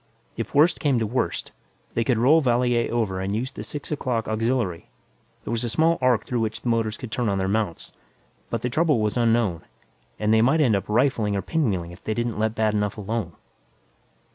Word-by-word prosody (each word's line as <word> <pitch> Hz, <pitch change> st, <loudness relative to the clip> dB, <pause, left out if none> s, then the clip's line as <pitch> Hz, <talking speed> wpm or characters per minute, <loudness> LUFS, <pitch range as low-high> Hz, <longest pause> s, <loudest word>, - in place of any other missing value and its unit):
If -, -, -5 dB
worst 155 Hz, +5 st, +4 dB
came 140 Hz, -4 st, +2 dB
to 115 Hz, -, 0 dB
worst, 105 Hz, -7 st, -2 dB, 0.4 s
they 115 Hz, -, +1 dB
could 120 Hz, 0 st, +1 dB
roll 140 Hz, +8 st, +5 dB
Valier 120 Hz, -2 st, +1 dB
over 110 Hz, -6 st, -1 dB
and 95 Hz, +2 st, -2 dB
use 125 Hz, +5 st, -2 dB
the -, -, -7 dB
six 145 Hz, 0 st, -7 dB
o'clock 125 Hz, -6 st, -1 dB
auxiliary; 110 Hz, -5 st, -1 dB, 0.5 s
there -, -, -5 dB
was 115 Hz, 0 st, -1 dB
a 120 Hz, -, -1 dB
small 165 Hz, +7 st, +2 dB
arc 125 Hz, -4 st, +2 dB
through 125 Hz, -, -2 dB
which 110 Hz, -1 st, -2 dB
the 120 Hz, -, -2 dB
motors 115 Hz, -2 st, 0 dB
could 125 Hz, -, -8 dB
turn 120 Hz, -2 st, 0 dB
on 100 Hz, -, 0 dB
their 95 Hz, 0 st, 0 dB
mounts. 100 Hz, -4 st, -2 dB, 0.6 s
But 115 Hz, -1 st, -3 dB
the 125 Hz, -, 0 dB
trouble 155 Hz, -3 st, +2 dB
was 105 Hz, -1 st, 0 dB
unknown, 115 Hz, -7 st, +2 dB, 0.6 s
and 105 Hz, +1 st, +1 dB
they 110 Hz, -, +5 dB
might 135 Hz, +7 st, +3 dB
end 125 Hz, -8 st, +4 dB
up 100 Hz, -, -3 dB
rifling 110 Hz, -3 st, +2 dB
or 100 Hz, -, -2 dB
pinwheeling 100 Hz, -, -1 dB
if 85 Hz, -, -14 dB
they 110 Hz, -, -2 dB
didn't 120 Hz, -2 st, -2 dB
let 110 Hz, +1 st, 0 dB
bad 110 Hz, -1 st, +1 dB
enough 105 Hz, -1 st, -1 dB
alone. 105 Hz, -4 st, -3 dB
115 Hz, 210 wpm, -24 LUFS, 105-125 Hz, 0.6 s, roll